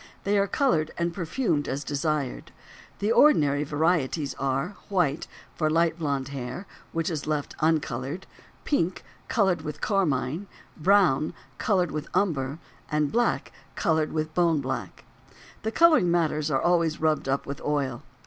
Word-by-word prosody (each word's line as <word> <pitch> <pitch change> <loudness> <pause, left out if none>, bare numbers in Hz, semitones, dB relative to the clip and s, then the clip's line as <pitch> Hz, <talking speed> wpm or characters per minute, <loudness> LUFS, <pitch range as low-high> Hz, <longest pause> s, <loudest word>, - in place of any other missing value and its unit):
They 200 +1 +1
are 200 - +2
colored 170 - +1
and 170 0 -1
perfumed 170 - -1
as 140 +2 -2
desired. 145 -1 -2 0.5
The 205 +2 0
ordinary 150 - +5
varieties 150 -1 0
are: 135 +3 0 0.2
white, 170 -6 +1 0.3
for 155 -2 0
light 165 +1 +2
blond 140 -4 -1
hair, 135 +6 -5 0.3
which 165 +1 -1
is 155 -3 -4
left 150 -2 -2
uncolored; 155 +1 -1 0.4
pink, 185 - 0 0.2
colored 190 -7 +2
with 150 -1 -6
carmine; 165 -2 0 0.3
brown, 160 -5 +3 0.2
colored 185 -5 +1
with 150 0 -4
umber; 145 -7 0 0.3
and 150 -2 +1
black, 240 +1 +1 0.2
colored 160 -2 +1
with 155 0 -2
bone 170 -3 +3
black. 130 -8 -5 0.6
The 220 - -2
coloring 315 - +5
matters 155 -3 +1
are 135 -3 +2
always 170 -2 +2
rubbed 155 -3 +1
up 135 +1 0
with 140 - -6
oil. 140 -5 -1
155 Hz, 140 wpm, -26 LUFS, 145-175 Hz, 0.6 s, ordinary